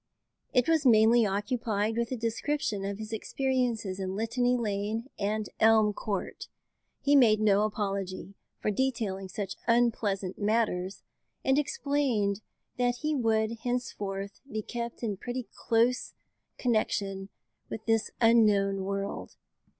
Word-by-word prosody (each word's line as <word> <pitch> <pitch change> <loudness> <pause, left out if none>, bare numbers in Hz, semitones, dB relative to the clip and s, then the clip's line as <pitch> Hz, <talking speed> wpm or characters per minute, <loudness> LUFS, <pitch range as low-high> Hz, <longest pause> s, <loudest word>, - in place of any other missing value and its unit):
It 250 -2 +3
was 325 -2 +3
mainly 225 -2 +6
occupied 210 +1 -1
with 235 +1 -1
a 255 - -1
description 230 -1 -1
of 200 0 -3
his 220 +1 -7
experiences 235 -5 -1
in 190 0 -3
Litany 245 +3 +1
Lane 215 +2 -2
and 210 +1 -1
Elm 220 -1 +5
Court. 200 -1 -4 0.5
He 285 +1 +4
made 225 -6 +6
no 205 -2 +4
apology 200 -2 -3 0.3
for 215 - 0
detailing 210 -5 -1
such 195 +1 -5
unpleasant 215 -5 +1
matters, 205 -3 0 0.4
and 265 +2 +4
explained 275 - 0 0.4
that 245 0 +2
he 305 0 0
would 225 -3 +1
henceforth 205 -5 -4
be 215 0 -3
kept 235 +1 -5
in 210 -4 -1
pretty 245 +3 -5
close 235 +2 +1 0.4
connection 200 -5 0 0.4
with - - -6
this 225 -1 +2
unknown 205 -4 +4
world. 200 +1 -4
220 Hz, 125 wpm, -29 LUFS, 200-245 Hz, 0.5 s, mainly